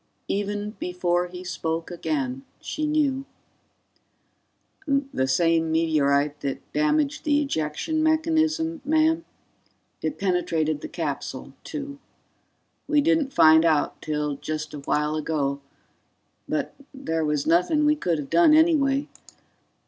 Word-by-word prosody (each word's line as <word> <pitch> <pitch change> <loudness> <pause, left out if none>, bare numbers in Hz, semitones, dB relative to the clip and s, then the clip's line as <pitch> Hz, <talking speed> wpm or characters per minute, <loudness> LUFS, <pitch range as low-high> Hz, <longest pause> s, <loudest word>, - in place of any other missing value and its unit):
Even 205 +1 -2
before 180 0 0
he 180 +1 -9
spoke 165 -2 -3
again, 140 -6 -3 0.2
she 305 0 -3
knew 290 -3 +1 1.6
"The 275 - 0
same 165 +3 +2
meteorite 150 -3 +2
that 135 -1 -5
damaged 300 -1 +1
the 295 -1 +3
ejection 275 - -1
mechanism, 320 0 +1
ma'am. 315 +3 +2 0.8
It 295 - -2
penetrated 165 -5 0
the - - -5
capsule, - - -5
too. 285 -2 -6 0.9
We 300 -1 +3
didn't 310 -2 +2
find 160 -7 +6
out 155 -3 +1
till 150 -2 -2
just 155 +1 -5
a 150 - -6
while 150 +2 0
ago 145 -3 -1 0.9
but - - -2 0.2
there 165 -12 -2
was 150 -2 0
nothing 180 - +3
we 300 0 +4
could 175 - -1
have 145 -2 -6
done 320 -3 +6
anyway 295 -3 +3
180 Hz, 120 wpm, -25 LUFS, -, 1.6 s, find